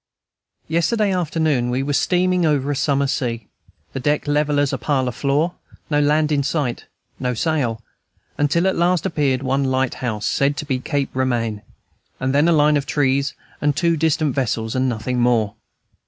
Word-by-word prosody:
Yesterday 195 +5 +1
afternoon 160 -8 0
we 125 +2 0
were 145 +1 -2
steaming 180 +3 +2
over 145 -3 +1
a - - -1
summer 140 -1 +1
sea, 120 -5 -2 0.5
the - - -3
deck 145 +3 0
level 145 0 +1
as 145 -1 +1
a 135 - -2
parlor 130 +1 0
floor, 145 +8 0 0.4
no 145 - +3
land 150 +1 +2
in 145 -1 +2
sight, 140 -4 -2 0.3
no 125 -1 -1
sail, 120 -5 -1 0.5
until 145 +5 +1
at 190 - +2
last 175 -1 +1
appeared 140 -4 0
one 135 +1 +1
light 130 -1 0
house, 110 -4 -2
said 140 +1 +1
to 150 - -4
be 135 -3 -1
Cape 140 +1 -2
Romaine, 120 -5 -1 0.6
and 130 +1 -1
then 145 +3 +4
a - - +4
line 150 -1 +4
of 140 - -3
trees 140 -1 +1 0.3
and 145 -1 +1
two 170 +1 +2
distant 155 -2 +1
vessels 115 -4 -1
and 130 0 +1
nothing 125 +2 -2
more. 120 -4 +2
140 Hz, 175 wpm, -21 LUFS, 130-155 Hz, 0.6 s, then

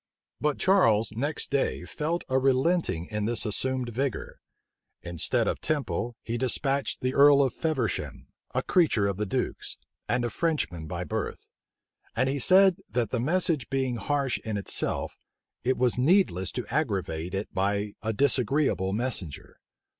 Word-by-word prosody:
But 150 -1 0
Charles 115 - +3
next 140 +8 -2
day 140 -1 0
felt 165 +3 -2
a 130 0 +2
relenting 135 - +1
in 105 -1 -1
this 120 +2 0
assumed 130 +3 -1
vigor. 130 +2 -3 0.6
Instead 85 -2 0
of - - -2
Temple, 135 -5 -2
he 115 +1 -3
despatched 135 +2 0
the 130 0 0
earl 140 0 +7
of 130 - 0
Feversham, 135 - -2 0.3
a - - +1
creature 155 - +3
of 100 -2 -1
the 105 0 -2
duke's, - - -3 0.3
and 120 - +1
a 120 - -2
Frenchman 105 - -1
by - - -4
birth; - - -5 0.6
and 130 +3 +2
he 140 +1 -1
said, 190 +6 +5
that 115 +1 -1
the 125 - 0
message 155 - +1
being 130 -3 0
harsh 140 +3 -1
in 110 -2 -4
itself, 100 - -2 0.4
it 130 +1 +1
was 125 -1 +1
needless 130 - +3
to 125 - -3
aggravate 95 - -1
it 100 +2 -4
by 100 +2 0
a 110 - -1
disagreeable 125 -4 +1
messenger. 105 - -3
125 Hz, 150 wpm, -27 LUFS, 105-145 Hz, 0.6 s, earl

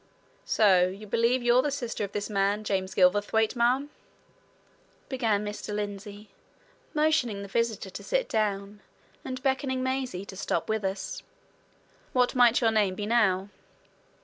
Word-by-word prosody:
"So 185 -4 +4
you 195 +3 -8
believe 235 +4 +1
you're 240 +1 +5
the 295 - -1
sister 245 -6 -3
of 200 - -4
this 205 0 -3
man 205 0 0
James 190 -2 -2
Gilverthwaite, 205 +5 +3
ma'am?" 255 +5 +1 1.2
began 225 -6 0
Mr. 210 0 -5
Lindsey, 205 0 -6 0.6
motioning 300 -10 +1
the - - -7
visitor 220 -2 -1
to - - -8
sit - - 0
down, 205 -1 -2 0.4
and 255 0 -6
beckoning 265 -1 0
Maisie 260 -8 -2
to 195 - -10
stop 170 -3 -2
with 220 -1 -1
us. 190 +1 -3 0.9
"What 250 -2 +2
might 245 -1 +5
your 225 -2 +3
name 205 -4 +2
be, 205 - -4
now?" 205 -4 +2
215 Hz, 145 wpm, -27 LUFS, 200-245 Hz, 1.2 s, you're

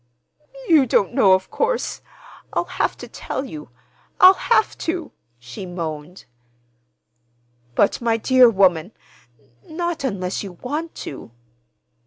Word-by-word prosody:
"You 305 -7 +5
don't 195 -5 +1
know, 190 -2 +5
of 185 0 0
course. 485 +1 -1 0.5
I'll - - 0
have - - -2
to - - -9
tell 265 - -5
you—I'll 135 - +1
have 440 +2 +1
to," 335 -1 -3 0.3
she 120 +9 -9
moaned. 170 0 -6 1.5
"But, 205 - +2
my 230 -1 +1
dear 255 +1 +5
woman,—not 185 - -3
unless 195 -7 -2
you 195 -3 -8
want 300 - -5
to." 135 - -8
195 Hz, 110 wpm, -21 LUFS, -, 1.5 s, You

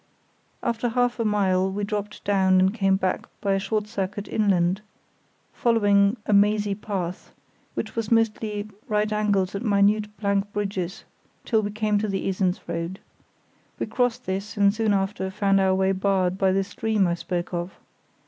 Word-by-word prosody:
After 235 0 0
half 245 +1 +1
a - - +2
mile 190 -3 +2
we 205 +2 -3
dropped 210 0 -4
down 190 -2 +3
and 190 +1 +3
came 195 -4 +2
back 190 -1 -1
by 200 -1 0
a 195 - +1
short 210 +2 -1
circuit 205 -1 -4
inland, 190 -2 +1 0.7
following 205 -2 +3
a 215 - +1
mazy 205 0 +3
path—which 195 +2 -6
was 230 -2 -3
mostly 215 -2 +1 0.2
right 210 0 0
angles 200 -3 +1
and 200 - -4
minute 210 0 +3
plank 200 -1 0
bridges, 195 -3 -3 0.4
till 220 -2 +2
we 205 - -2
came 210 0 0
to 215 - -1
the 195 -1 -2
Esens 185 -1 0
road. 170 +2 -4 0.8
We - - -2
crossed 245 -3 -1
this 195 +3 -4
and 200 -1 +4
soon 220 -1 +1
after 195 0 -1
found 195 0 +2
our 190 -1 +3
way 190 0 +2
barred 190 -1 +1
by 190 -1 +2
the 195 +1 +2
stream 210 +1 0
I 175 - +1
spoke 175 +1 -4
of. 175 +2 -3
200 Hz, 165 wpm, -25 LUFS, 190-210 Hz, 0.8 s, and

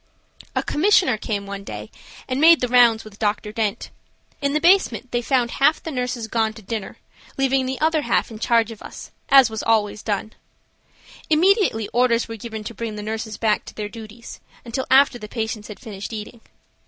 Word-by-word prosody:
A - - +1
"commissioner" 360 - +3
came 210 -2 -4
one 200 0 -7
day, 105 - -8 0.4
and 260 +2 -2
made 330 +1 +7
the 250 - 0
rounds 240 -2 +5
with 215 -1 -14
Dr. 210 0 -1
Dent. 215 -2 -2 0.5
In 280 0 0
the 305 - +2
basement 320 - +3
they 240 - 0
found 245 -1 +1
half 300 +3 +2
the 325 - -5
nurses 250 -3 -3
gone 220 -1 0
to 220 - -13
dinner, 215 0 -5 0.4
leaving 270 -1 +1
the 260 0 -3
other 315 0 +2
half 285 - 0
in 215 - -9
charge 230 0 +2
of 220 - -11
us, - - -10 0.2
as 270 -4 +7
was 220 - -4
always 210 -2 +1
done. 215 0 -3 1.0
Immediately 325 - +3
orders 240 -1 +2
were 225 - -6
given 220 0 -7
to 230 - -7
bring 225 0 -5
the 210 - -6
nurses 220 0 -4
back 215 -2 +1
to - - -11
their 210 -1 -4
duties 225 +1 -11 0.3
until 240 +3 -3
after 265 -2 +5
the 210 - -8
patients 220 -1 -4
had 210 - -10
finished 205 -5 -8
eating. 220 +2 -8
230 Hz, 190 wpm, -22 LUFS, 215-260 Hz, 1.0 s, made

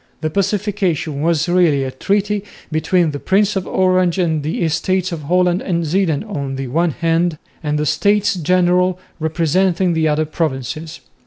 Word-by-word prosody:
The 155 -1 -2
Pacification 190 -6 -1
was 165 0 +1
really 175 -6 +3
a 130 - -3
treaty 200 +7 -1 0.3
between 160 +1 +1
the 145 - -5
Prince 205 +4 +1
of 190 -1 -2
Orange 185 -1 +2
and 160 -4 +1
the 155 +4 -2
Estates 180 +3 0
of 165 -3 -4
Holland 180 +4 +1
and 170 -3 -1
Zeeland 165 -1 0
on 140 -10 -4
the 135 -1 -4
one 170 +6 +1
hand, 165 +1 0 0.2
and 150 -2 -1
the 150 - 0
States 205 +7 +2
General 180 +1 +2 0.2
representing 170 +3 +1
the 160 -1 +1
other 155 +1 +1
provinces. 155 +1 -4
170 Hz, 160 wpm, -18 LUFS, 155-185 Hz, 0.3 s, really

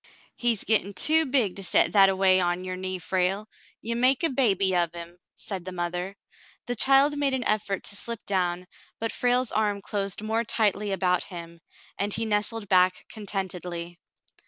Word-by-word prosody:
" - - -28
He's 235 -4 +1
gettin' 205 -2 +1
too 315 +9 +3
big 250 -9 +1
to 195 - -4
set - - +3
that 195 -2 +6
a 190 - 0
way 190 -1 +4
on 175 0 -1
your 185 0 -4
knee, 185 0 -4
Frale. 190 +3 -1 0.4
Ye 235 - -2
make 255 +5 +2
a 330 - +3
baby 195 -8 +2
of 170 -1 0
him," 170 +1 -9 0.2
said 190 -4 -6
the 185 - -6
mother. 180 +2 -4 0.5
The 245 - -3
child 275 +4 +5
made 275 -2 +1
an 255 - -3
effort 210 -3 -1
to - - -4
slip 230 +2 -5
down, 180 -2 -1 0.3
but 225 0 -2
Frale's 245 0 +1
arm 210 -2 0
closed 200 0 -3
more 225 +2 0
tightly 210 -2 0
about 180 -2 +1
him, 170 -2 -9 0.4
and 205 +1 -1
he 225 - -1
nestled 210 0 -1
back 185 -1 +3
contentedly. 180 -4 -5
200 Hz, 180 wpm, -26 LUFS, 180-225 Hz, 0.5 s, that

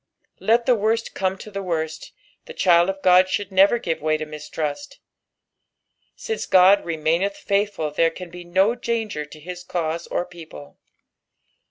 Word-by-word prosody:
Let 230 +4 +2
the 255 - +4
worst 225 +1 0
come 190 0 -1
to 215 - -11
the 195 0 -4
worst, 160 -3 -4 0.3
the 480 - -10
child 175 0 +4
o( 195 - -2
Ood 185 +1 +6
should 200 +1 -2
never 195 +5 +5
give 165 -8 -3
way 155 0 +1
to 155 - -5
mistrust; 150 +3 -6 1.2
since 445 0 -4
Ood 190 +2 +6
remaincth 170 +4 0
faithful 200 -6 -1
there 165 +2 +2
can 175 +1 -10
be 175 0 -9
no 190 +6 +2
danger 225 -9 -3
to 155 - -13
hia 180 +4 -8
cause 165 -1 -2
or 175 - -2
people. 160 - -13
180 Hz, 160 wpm, -22 LUFS, 160-200 Hz, 1.2 s, Ood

